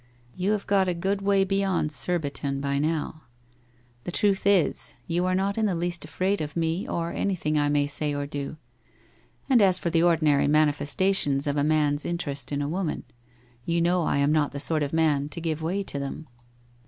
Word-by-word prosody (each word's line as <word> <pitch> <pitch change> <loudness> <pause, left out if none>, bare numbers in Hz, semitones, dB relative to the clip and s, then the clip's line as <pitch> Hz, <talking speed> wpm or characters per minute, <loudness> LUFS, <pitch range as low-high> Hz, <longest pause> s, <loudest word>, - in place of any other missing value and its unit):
You 190 +3 0
have 210 - -2
got 195 -2 +2
a 180 - 0
good 195 +3 -1
way 195 0 +3
beyond 195 -5 0
Kurbifon 145 -4 -2
by 140 0 -1
now.... 155 +1 -2 0.8
The 175 - -5
truth 195 +1 +1
is, 195 -5 +2
you 175 +2 0
arc 185 0 +1
not 200 +3 -1
in 220 - +2
the 190 - 0
least 175 +1 -2
afraid 195 +1 -1
of 150 -1 -5
me, 165 +3 -1
or 170 0 -2
anything 175 -6 -1
I 145 0 +2
may 145 -1 +2
ay 150 -1 +1
or 145 0 -2
do.... 145 +1 -5 0.9
Ami 245 -6 +5
as 185 -2 +4
for 170 - -2
the 165 -1 +3
ordinary 155 -5 +3
mani 150 0 +4
festations 145 -2 0
of 145 -1 0
.•' 145 - +1
man's 150 -1 +1
interest 150 -6 -3
in 145 0 -1
a - - -2
woman, 175 +1 -2 0.6
you 170 +5 0
know 175 +1 +2
r - - 0
am 140 +1 +2
not 150 -2 +1
the 140 - -4
sort 155 +2 0
of 145 -1 -1
man 150 -3 +1
to 150 - -6
give 160 -1 -2
way 185 +5 -1
to 145 - -3
them. 140 +3 -5
165 Hz, 205 wpm, -26 LUFS, 145-185 Hz, 0.9 s, Ami